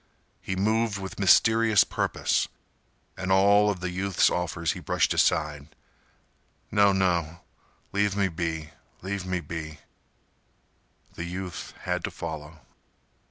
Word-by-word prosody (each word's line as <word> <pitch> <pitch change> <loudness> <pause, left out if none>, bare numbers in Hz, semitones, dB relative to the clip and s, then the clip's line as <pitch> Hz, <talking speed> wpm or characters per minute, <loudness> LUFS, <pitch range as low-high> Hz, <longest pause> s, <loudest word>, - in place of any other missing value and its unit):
He 95 - -3
moved 110 +2 +1
with 95 0 -7
mysterious 110 +2 +5
purpose, - - 0 0.7
and 95 0 -3
all 100 +2 +5
of 95 -3 -3
the 90 0 -3
youth's 95 0 +2
offers 85 -2 -1
he - - -6
brushed - - +1
aside. 75 -2 +1 1.0
"No—no—leave 95 +1 0
me 100 -1 +2
be—leave 85 +3 -5
me 90 -1 -1
be—" 80 -2 -6 1.4
The 85 - -6
youth 90 -2 -6
had - - -2
to - - -3
follow. 80 -1 -7
95 Hz, 110 wpm, -26 LUFS, 85-100 Hz, 1.4 s, mysterious